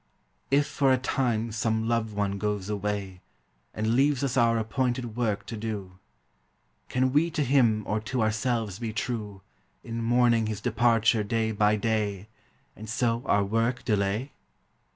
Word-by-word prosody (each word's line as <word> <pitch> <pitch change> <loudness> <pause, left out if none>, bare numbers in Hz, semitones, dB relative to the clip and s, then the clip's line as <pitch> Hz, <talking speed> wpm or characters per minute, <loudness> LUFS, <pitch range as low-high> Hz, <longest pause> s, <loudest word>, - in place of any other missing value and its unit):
If 140 +1 +3
for 135 -2 +1
a 130 - +4
time 120 -3 -1
some 110 0 -1
loved 115 -2 -1
one 100 -1 -1
goes 105 -2 -2
away, 100 -2 -3 0.5
And 110 +2 -1
leaves 140 +2 +2
us 135 -2 -1
our 115 -2 +3
appointed 120 0 -1
work 105 -5 -1
to 115 - -6
do, 105 -4 -5 0.9
Can 130 0 +1
we 160 +4 +3
to 160 -3 -1
him 120 -5 +3
or 105 - -1
to 110 +3 -2
ourselves 110 -2 -1
be 115 -2 -4
true 105 -4 -4 0.4
In 115 0 -4
mourning 120 -1 +3
his 110 -2 -3
departure 115 -1 +2
day 110 +1 0
by 105 0 +3
day, 105 -2 -1 0.5
And 110 0 -9
so 115 +1 0
our 100 0 +3
work 115 +5 -1
delay? 105 +5 0
110 Hz, 150 wpm, -27 LUFS, 105-120 Hz, 0.9 s, a